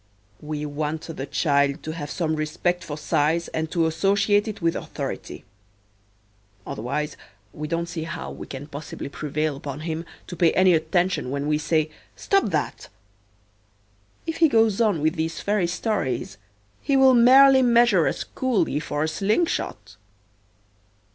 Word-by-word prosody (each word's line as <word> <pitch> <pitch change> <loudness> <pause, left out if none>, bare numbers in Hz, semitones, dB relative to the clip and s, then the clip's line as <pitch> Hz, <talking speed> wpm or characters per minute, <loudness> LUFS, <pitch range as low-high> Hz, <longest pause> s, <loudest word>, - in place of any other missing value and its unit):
We 150 0 -4
want 150 +2 -3
the 135 - -5
child 140 -1 +1
to 155 - -4
have 155 -3 -6
some 160 -3 -1
respect 170 +4 -1
for 150 -3 -6
size 155 +2 0
and 160 0 -3
to 165 -1 +1
associate 200 +5 +2
it 215 - -5
with 165 -1 0
authority. - - -6 1.2
Otherwise 140 +7 -3 0.4
we 150 +1 -5
don't 170 +1 -1
see 165 -2 -5
how 170 +1 -6
we - - -9
can 135 +1 -7
possibly 145 -1 -7
prevail 150 +1 -2
upon 140 +1 -7
him 160 +1 -4 0.2
to 175 - -8
pay 170 -2 +3
any 185 -1 +5
attention 175 -2 0
when 140 +1 -2
we 150 0 +1
say, 155 0 0 0.2
"Stop 395 -1 +1
that." 155 -5 -3 1.4
If 325 -1 -3
he 325 -2 +5
goes 225 -3 +3
on 205 -9 +2
with 155 +1 +1
these 160 +1 -2
fairy 205 -3 0
stories 170 - -2 0.4
he 275 - +1
will 265 -1 +6
merely 265 +3 +7
measure 235 -7 +4
us - - -2
coolly 205 - 0
for 150 -1 -2
a - - 0
slingshot. 160 - -1
160 Hz, 150 wpm, -24 LUFS, 150-200 Hz, 1.4 s, merely